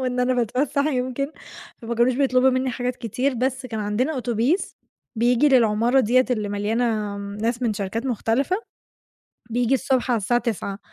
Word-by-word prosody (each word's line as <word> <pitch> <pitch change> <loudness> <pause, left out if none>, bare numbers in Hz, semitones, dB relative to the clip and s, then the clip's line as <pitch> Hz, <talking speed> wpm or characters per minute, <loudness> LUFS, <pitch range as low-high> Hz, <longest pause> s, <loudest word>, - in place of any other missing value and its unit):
وإن 250 -1 -1
أنا 250 +1 +2
باتفسّح 270 +5 0
يمكن، 260 -1 -1 0.6
فما 235 +1 -3
كانوش 240 +2 +3
بيطلبوا 260 -1 +3
منّي 255 0 0
حاجات 245 0 -3
كتير، 250 +3 -1
بس 260 +2 -2
كان 220 -3 -4
عندنا 215 +9 0
أوتوبيس 245 - -1 0.4
بييجي 245 +5 +3
للعمارة 240 0 +4
ديّة 255 +2 +3
اللي 215 -4 -1
مليانة 210 0 -1
م 200 0 -6
ناس 235 +2 -1
من 230 - +1
شركات 210 +5 -3
مختلفة، 255 - 0 0.9
بييجي 245 +2 +1
الصبح 265 -1 +1
على 235 - +3
الساعة 240 +4 +1
09:00 205 -4 -3
245 Hz, 160 wpm, -23 LUFS, 225-260 Hz, 0.9 s, للعمارة